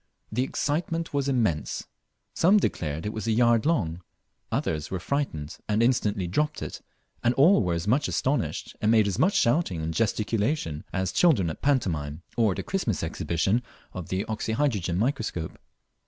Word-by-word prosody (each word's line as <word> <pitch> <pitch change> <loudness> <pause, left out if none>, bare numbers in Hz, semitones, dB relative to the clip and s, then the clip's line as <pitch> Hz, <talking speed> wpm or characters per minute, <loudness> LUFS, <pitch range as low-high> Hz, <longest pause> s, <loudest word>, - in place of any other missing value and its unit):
The 115 +4 0
excitement 165 +5 -1
was 140 -1 0
immense. 110 - 0 0.5
Some 190 +5 +5
declared 80 - -1
it 105 - -2
was 110 +1 -4
a - - +2
yard 120 +2 +3
long; 90 - 0 0.5
others 75 -1 -1
were 95 - -3
frightened, 85 - -2
and 105 +2 +3
instantly 105 -6 +1
dropped 150 - -1
it, - - -6 0.4
and 120 +1 +2
all 165 +9 +6
were 90 -3 0
as 85 +4 -3
much 135 +7 +2
astonished, 135 -2 -1
and 105 - +2
made 110 -2 +5
as 95 - -2
much 200 +3 +3
shouting 120 - +2
and 80 +1 -3
gesticulation, 110 - 0
as 95 -1 -1
children 115 - +3
at - - -8
a - - -39
pantomime, 85 - 0
or 110 -5 +3
at - - -9
a - - -3
Christmas 155 - -1
exhibition 85 +7 0 0.3
of 90 -3 -7
the 95 +1 -1
oxyhydrogen 110 -5 -1
microscope. 110 - -2
110 Hz, 170 wpm, -26 LUFS, 90-140 Hz, 0.5 s, all